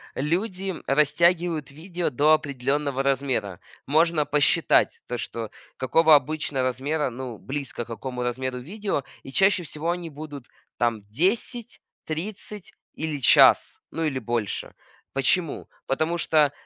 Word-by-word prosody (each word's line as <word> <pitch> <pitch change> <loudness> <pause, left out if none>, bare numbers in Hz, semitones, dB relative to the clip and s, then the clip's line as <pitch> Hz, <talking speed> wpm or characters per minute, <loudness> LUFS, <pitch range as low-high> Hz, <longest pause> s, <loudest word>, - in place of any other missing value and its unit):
люди 185 +6 -1
растягивают 160 +1 +2
видео 170 +3 -3
до 145 +5 +4
определённого 140 -1 0
размера. 130 -9 -1 0.3
Можно 155 +1 +3
посчитать 145 0 +3
то, 120 - -3
что 115 -2 -5 0.3
какого 155 +5 +5
обычно 145 -1 0
размера, 135 +4 -1
ну, 125 -2 -7
близко 135 -2 -5
к - - -25
какому 125 +1 -5
размеру 125 +1 -2
видео. 190 - -3 0.2
И 135 - -9
чаще 190 +2 +3
всего 160 +2 -2
они 175 -1 -4
будут 145 -3 -9 0.3
там 115 -3 0
10, 215 - -1 0.3
30 195 +4 -5 0.2
или 155 -2 -3
час, - - +6
ну 165 - -3
или 145 -4 -1
больше. 115 -3 -2 0.4
Почему? 150 +5 +1 0.2
Потому 160 +5 0
что, 155 -4 +3
145 Hz, 125 wpm, -25 LUFS, 130-165 Hz, 0.4 s, час